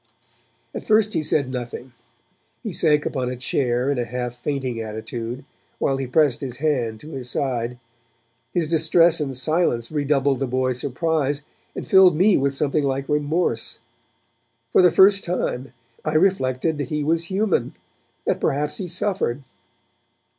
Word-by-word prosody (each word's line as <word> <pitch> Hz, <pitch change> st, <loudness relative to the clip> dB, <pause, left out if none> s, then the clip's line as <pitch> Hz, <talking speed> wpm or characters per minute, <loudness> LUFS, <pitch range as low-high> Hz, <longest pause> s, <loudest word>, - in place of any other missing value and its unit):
At -, -, -5 dB
first 215 Hz, 0 st, +3 dB
he -, -, +1 dB
said 140 Hz, -3 st, 0 dB
nothing. 125 Hz, 0 st, -6 dB, 0.7 s
He -, -, -4 dB
sank 150 Hz, -1 st, +3 dB
upon 130 Hz, -3 st, -2 dB
a 125 Hz, -, -4 dB
chair 125 Hz, +1 st, 0 dB
in 140 Hz, -, -1 dB
a -, -, +1 dB
half 125 Hz, +1 st, -4 dB
fainting 130 Hz, -2 st, -3 dB
attitude, 115 Hz, +3 st, -6 dB, 0.3 s
while 135 Hz, -, 0 dB
he 135 Hz, -1 st, -3 dB
pressed 145 Hz, 0 st, +2 dB
his 125 Hz, -3 st, -5 dB
hand 125 Hz, -7 st, -1 dB
to 155 Hz, -, -10 dB
his 130 Hz, -4 st, -6 dB
side; 125 Hz, -2 st, -2 dB, 0.7 s
his 170 Hz, -3 st, 0 dB
distress 165 Hz, +1 st, +4 dB
and 135 Hz, -3 st, -2 dB
silence 130 Hz, -3 st, 0 dB
redoubled 140 Hz, -2 st, +1 dB
the 135 Hz, -, -1 dB
boys' 130 Hz, 0 st, -1 dB
surprise, 145 Hz, +1 st, -1 dB, 0.3 s
and -, -, -6 dB
filled 190 Hz, -3 st, +6 dB
me 190 Hz, +3 st, +5 dB
with 140 Hz, 0 st, +1 dB
something 150 Hz, +1 st, 0 dB
like 135 Hz, 0 st, -1 dB
remorse. 150 Hz, -5 st, 0 dB, 0.9 s
For -, -, +5 dB
the 180 Hz, -, +7 dB
first 195 Hz, +3 st, +5 dB
time, 135 Hz, -7 st, -3 dB, 0.3 s
I 155 Hz, 0 st, -2 dB
reflected 155 Hz, -4 st, +1 dB
that 145 Hz, -, -3 dB
he 150 Hz, -1 st, -1 dB
was 165 Hz, +2 st, +1 dB
human, 190 Hz, -, 0 dB, 0.5 s
that -, -, 0 dB
perhaps 150 Hz, +2 st, 0 dB
he 185 Hz, -, -4 dB
suffered. 175 Hz, -7 st, -1 dB
140 Hz, 155 wpm, -22 LUFS, 125-160 Hz, 0.9 s, the